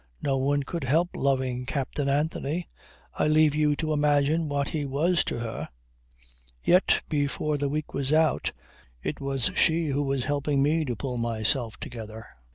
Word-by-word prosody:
"No 135 Hz, -1 st, +1 dB
one 140 Hz, +1 st, +1 dB
could 170 Hz, +3 st, -4 dB
help 160 Hz, +7 st, +2 dB
loving 130 Hz, -2 st, 0 dB
Captain 140 Hz, 0 st, -2 dB
Anthony. 155 Hz, +3 st, -1 dB, 0.5 s
I -, -, +1 dB
leave 155 Hz, -1 st, +4 dB
you 150 Hz, -1 st, +2 dB
to 155 Hz, +1 st, -1 dB
imagine 150 Hz, +2 st, +2 dB
what 140 Hz, -1 st, 0 dB
he 155 Hz, -2 st, -2 dB
was 155 Hz, +6 st, +1 dB
to -, -, -2 dB
her. 115 Hz, -1 st, -5 dB, 0.9 s
Yet 180 Hz, +2 st, +4 dB
before 145 Hz, 0 st, -1 dB
the 140 Hz, 0 st, 0 dB
week 150 Hz, +1 st, -3 dB
was 135 Hz, 0 st, -1 dB
out 160 Hz, 0 st, +2 dB, 0.5 s
it 145 Hz, -, -3 dB
was 135 Hz, -3 st, -1 dB
she 165 Hz, -1 st, +3 dB
who 140 Hz, +1 st, 0 dB
was 135 Hz, -2 st, 0 dB
helping 145 Hz, 0 st, +1 dB
me 155 Hz, +2 st, +2 dB
to 125 Hz, -3 st, -2 dB
pull 125 Hz, +2 st, -4 dB
myself 115 Hz, +1 st, 0 dB
together." 110 Hz, -2 st, -8 dB
145 Hz, 165 wpm, -27 LUFS, 135-155 Hz, 0.9 s, leave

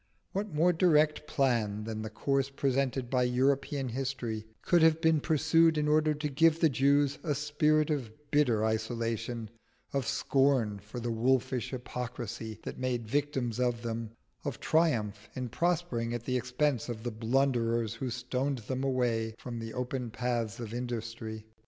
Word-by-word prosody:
What 200 Hz, +1 st, -3 dB
more 165 Hz, +4 st, +3 dB
direct 155 Hz, -3 st, +3 dB
plan 115 Hz, -6 st, +1 dB
than 110 Hz, 0 st, -4 dB
the 110 Hz, -, -4 dB
course 135 Hz, +4 st, 0 dB
presented 135 Hz, -2 st, 0 dB
by 125 Hz, 0 st, +1 dB
European 135 Hz, +2 st, +1 dB
history 120 Hz, -4 st, -3 dB, 0.2 s
could 175 Hz, -2 st, +4 dB
have 160 Hz, 0 st, +5 dB
been 160 Hz, -1 st, +3 dB
pursued 160 Hz, +1 st, +3 dB
in 150 Hz, 0 st, +1 dB
order 155 Hz, 0 st, +3 dB
to 150 Hz, +1 st, -2 dB
give 160 Hz, +3 st, +3 dB
the 160 Hz, -, +5 dB
Jews 140 Hz, +2 st, +2 dB
a 150 Hz, -4 st, -1 dB
spirit 150 Hz, +1 st, +2 dB
of 135 Hz, -7 st, -1 dB, 0.2 s
bitter 125 Hz, -7 st, +3 dB
isolation, 115 Hz, 0 st, -2 dB, 0.4 s
of 135 Hz, -4 st, 0 dB
scorn 130 Hz, -7 st, +2 dB
for 105 Hz, +5 st, -8 dB
the 120 Hz, 0 st, -2 dB
wolfish 125 Hz, +1 st, +1 dB
hypocrisy 120 Hz, -3 st, -5 dB
that -, -, -6 dB
made 125 Hz, -3 st, -1 dB
victims 130 Hz, -3 st, -1 dB
of 120 Hz, -1 st, 0 dB
them, 115 Hz, -1 st, -3 dB, 0.3 s
of 140 Hz, -5 st, -4 dB
triumph 115 Hz, -11 st, +1 dB
in 125 Hz, -1 st, -3 dB
prospering 130 Hz, -6 st, 0 dB
at 120 Hz, -, -5 dB
the 130 Hz, +1 st, -1 dB
expense 125 Hz, 0 st, 0 dB
of 110 Hz, -2 st, -5 dB
the 120 Hz, -, -2 dB
blunderers 115 Hz, -1 st, +1 dB
who 130 Hz, -, -4 dB
stoned 125 Hz, +3 st, -2 dB
them 130 Hz, +3 st, -4 dB
away 120 Hz, -4 st, 0 dB
from 120 Hz, -2 st, -6 dB
the 115 Hz, 0 st, -5 dB
open 125 Hz, -1 st, -3 dB
paths 120 Hz, -2 st, -2 dB
of 115 Hz, -2 st, -6 dB
industry? 115 Hz, -2 st, -5 dB
125 Hz, 160 wpm, -30 LUFS, 115-145 Hz, 0.4 s, have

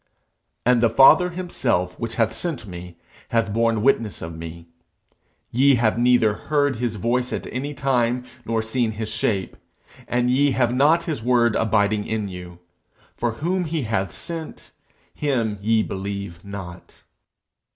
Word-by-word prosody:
'And 125 Hz, -1 st, +4 dB
the 115 Hz, -, +4 dB
Father 135 Hz, -, +6 dB
himself 120 Hz, -, -1 dB
which 115 Hz, -1 st, -4 dB
hath 115 Hz, -1 st, +1 dB
sent 155 Hz, -2 st, -4 dB
me, 90 Hz, -2 st, -9 dB, 0.3 s
hath 115 Hz, -3 st, 0 dB
borne 115 Hz, -1 st, +1 dB
witness 115 Hz, -5 st, +2 dB
of 80 Hz, 0 st, -6 dB
me. 85 Hz, +1 st, -9 dB, 0.8 s
Ye 135 Hz, +3 st, +5 dB
have 115 Hz, -1 st, +1 dB
neither 120 Hz, -3 st, +4 dB
heard 145 Hz, +3 st, 0 dB
his 120 Hz, -2 st, -2 dB
voice 120 Hz, +5 st, 0 dB
at -, -, -3 dB
any 140 Hz, +4 st, -3 dB
time, 125 Hz, -3 st, +1 dB, 0.2 s
nor 115 Hz, 0 st, -1 dB
seen 110 Hz, 0 st, -1 dB
his 110 Hz, 0 st, -4 dB
shape. 100 Hz, -3 st, -1 dB, 0.5 s
And 125 Hz, 0 st, +1 dB
ye 140 Hz, +2 st, +3 dB
have 120 Hz, -2 st, +1 dB
not 150 Hz, +6 st, +4 dB
his 155 Hz, -9 st, -3 dB
word 120 Hz, -2 st, +3 dB
abiding 105 Hz, -1 st, +1 dB
in 110 Hz, -2 st, -2 dB
you: 90 Hz, -1 st, -9 dB, 0.6 s
for 120 Hz, -1 st, -1 dB
whom 175 Hz, +9 st, -1 dB
he 160 Hz, -2 st, -2 dB
hath 95 Hz, -5 st, -1 dB
sent, 165 Hz, -2 st, -7 dB, 0.4 s
him 115 Hz, -8 st, -1 dB
ye 110 Hz, +1 st, +2 dB
believe 100 Hz, -3 st, -5 dB
not.' 95 Hz, -3 st, -9 dB
115 Hz, 150 wpm, -23 LUFS, 105-130 Hz, 0.8 s, Father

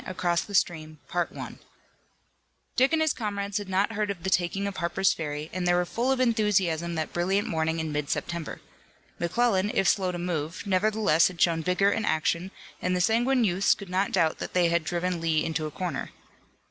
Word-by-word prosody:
ACROSS 175 Hz, -2 st, 0 dB
THE 205 Hz, -, -6 dB
STREAM 155 Hz, -3 st, 0 dB, 1.8 s
Dick 260 Hz, +3 st, +4 dB
and 320 Hz, -1 st, +2 dB
his 315 Hz, -, +2 dB
comrades 200 Hz, -2 st, -3 dB
had 205 Hz, -2 st, -7 dB
not 195 Hz, +3 st, +1 dB
heard 210 Hz, -1 st, -1 dB
of 185 Hz, -4 st, -5 dB
the 190 Hz, -, -1 dB
taking 190 Hz, +2 st, +1 dB
of 200 Hz, -1 st, -4 dB
Harper's 180 Hz, +3 st, +1 dB
Ferry 150 Hz, -1 st, -5 dB
and 180 Hz, 0 st, -2 dB
they 175 Hz, -, +4 dB
were 180 Hz, 0 st, +2 dB
full 240 Hz, +8 st, -1 dB
of 265 Hz, -, +1 dB
enthusiasm 195 Hz, -8 st, +1 dB
that 155 Hz, -1 st, -3 dB
brilliant 190 Hz, +4 st, 0 dB
morning 160 Hz, 0 st, -1 dB
in 160 Hz, -1 st, -3 dB
mid 150 Hz, -1 st, -2 dB
September. 170 Hz, -2 st, -3 dB, 0.6 s
McClellan, 200 Hz, +2 st, +1 dB
if 195 Hz, -, +1 dB
slow 190 Hz, -3 st, +2 dB
to 175 Hz, -, -5 dB
move, 170 Hz, -2 st, -3 dB
nevertheless 200 Hz, -3 st, +3 dB
had 180 Hz, -2 st, -8 dB
shown 165 Hz, -2 st, +3 dB
vigor 180 Hz, +4 st, +2 dB
in 225 Hz, -, -1 dB
action, 170 Hz, +1 st, 0 dB, 0.3 s
and 180 Hz, 0 st, 0 dB
the -, -, 0 dB
sanguine 240 Hz, +6 st, +2 dB
youths 190 Hz, -1 st, +3 dB
could 200 Hz, -3 st, -10 dB
not 190 Hz, +2 st, +1 dB
doubt 165 Hz, -4 st, +1 dB
that -, -, -5 dB
they 175 Hz, -2 st, +4 dB
had 170 Hz, -1 st, +1 dB
driven 175 Hz, +1 st, -2 dB
Lee 160 Hz, -2 st, +1 dB
into 160 Hz, -1 st, -2 dB
a -, -, -8 dB
corner. 180 Hz, +3 st, -4 dB
180 Hz, 195 wpm, -27 LUFS, 170-200 Hz, 1.8 s, Dick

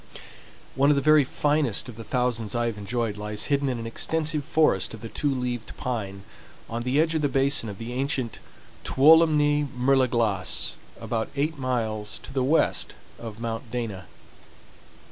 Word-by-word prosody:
One 140 Hz, +2 st, +3 dB
of 150 Hz, -, +5 dB
the 140 Hz, -, +1 dB
very 155 Hz, -1 st, +6 dB
finest 145 Hz, -3 st, 0 dB
of 120 Hz, -, -9 dB
the 115 Hz, -, -8 dB
thousands 120 Hz, -3 st, -1 dB
I 120 Hz, 0 st, +1 dB
have 115 Hz, -2 st, -2 dB
enjoyed 110 Hz, +1 st, -2 dB
lies 105 Hz, 0 st, -3 dB
hidden 140 Hz, -1 st, +1 dB
in 125 Hz, -, -2 dB
an 115 Hz, -, -6 dB
extensive 155 Hz, +5 st, -1 dB
forest 150 Hz, -, +2 dB
of 110 Hz, -, -13 dB
the 115 Hz, -, -7 dB
Two 145 Hz, -, -1 dB
leaved 125 Hz, -3 st, -4 dB
Pine, 100 Hz, -6 st, -4 dB, 0.4 s
on 115 Hz, +1 st, -4 dB
the 125 Hz, +4 st, +1 dB
edge 160 Hz, +1 st, +2 dB
of 160 Hz, -, 0 dB
the 145 Hz, -, +1 dB
basin 135 Hz, -4 st, +1 dB
of 100 Hz, -, -7 dB
the 115 Hz, +3 st, -6 dB
ancient 130 Hz, -2 st, -2 dB, 0.4 s
Tuolumne 150 Hz, 0 st, +5 dB
Mer 135 Hz, +2 st, +3 dB
de 130 Hz, -1 st, +4 dB
Glace, 110 Hz, -7 st, 0 dB, 0.2 s
about 110 Hz, -1 st, -2 dB
eight 145 Hz, +1 st, -1 dB
miles 110 Hz, -4 st, -1 dB
to -, -, -9 dB
the 135 Hz, -, 0 dB
west 150 Hz, +5 st, +2 dB, 0.2 s
of 110 Hz, -2 st, -8 dB
Mount 115 Hz, +1 st, -4 dB
Dana. 110 Hz, -6 st, -4 dB
125 Hz, 175 wpm, -25 LUFS, 115-140 Hz, 0.4 s, very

